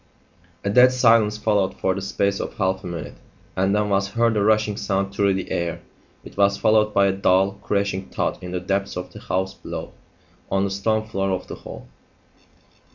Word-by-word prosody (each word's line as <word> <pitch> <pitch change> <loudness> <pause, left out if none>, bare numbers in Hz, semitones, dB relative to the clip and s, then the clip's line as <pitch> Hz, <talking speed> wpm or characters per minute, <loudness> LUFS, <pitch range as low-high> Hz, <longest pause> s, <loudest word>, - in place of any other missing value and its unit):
A 100 - -1
dead 125 +3 +7
silence 115 -4 +4
followed 105 -3 +1
for 95 - +1
the 95 - -5
space 100 +1 -1
of - - -5
half 95 -1 0
a - - -6
minute, 85 -3 -6 0.4
and 95 +2 +1
then 105 0 +1
was 100 0 +1
heard 115 +2 +1
a 105 - +1
rushing 110 0 +2
sound 100 -1 -2
through 100 -1 +2
the 95 - -5
air. 85 -1 -2 0.4
It - - -13
was 100 0 +3
followed 110 -1 +3
by 100 -1 +3
a 100 - +3
dull, 95 +1 +2
crashing 100 -2 -1
thud - - -2
in 90 - -7
the 90 0 -2
depths 95 +1 -2
of 90 - -6
the - - -9
house 95 +1 -2
below - - -7 0.6
on 95 0 +1
the 100 - -1
stone 110 +3 0
floor 95 -3 -2
of 95 -1 -2
the - - -8
hall. - - -10
100 Hz, 200 wpm, -23 LUFS, 95-105 Hz, 0.6 s, dead